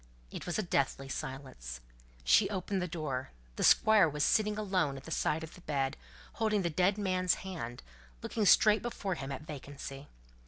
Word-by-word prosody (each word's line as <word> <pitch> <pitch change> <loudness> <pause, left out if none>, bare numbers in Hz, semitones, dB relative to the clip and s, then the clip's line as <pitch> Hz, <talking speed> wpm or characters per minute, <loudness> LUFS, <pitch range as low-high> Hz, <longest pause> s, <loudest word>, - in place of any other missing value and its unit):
It - - -7
was 175 - -1
a 215 - 0
deathly 135 -5 0
silence. 130 - -6 0.4
She 195 -3 +5
opened 195 -1 -2
the 180 - -1
door: 150 -6 -3 0.3
the - - -2
Squire 215 -6 +6
was 150 0 -1
sitting 210 +3 +2
alone 185 -9 0
at 135 - -10
the 160 - -9
side 155 0 0
of 160 - -9
the 180 - -14
bed, 140 -3 -1 0.5
holding 215 -3 +2
the 170 - 0
dead 185 +5 +2
man's 185 -3 +1
hand, 155 -11 -6
and - - -24
looking 215 -3 0
straight 215 +2 +6
before 205 -5 -3
him 135 -4 -5
at 135 +2 -5
vacancy. 140 -1 -8
160 Hz, 185 wpm, -32 LUFS, 135-195 Hz, 0.5 s, Squire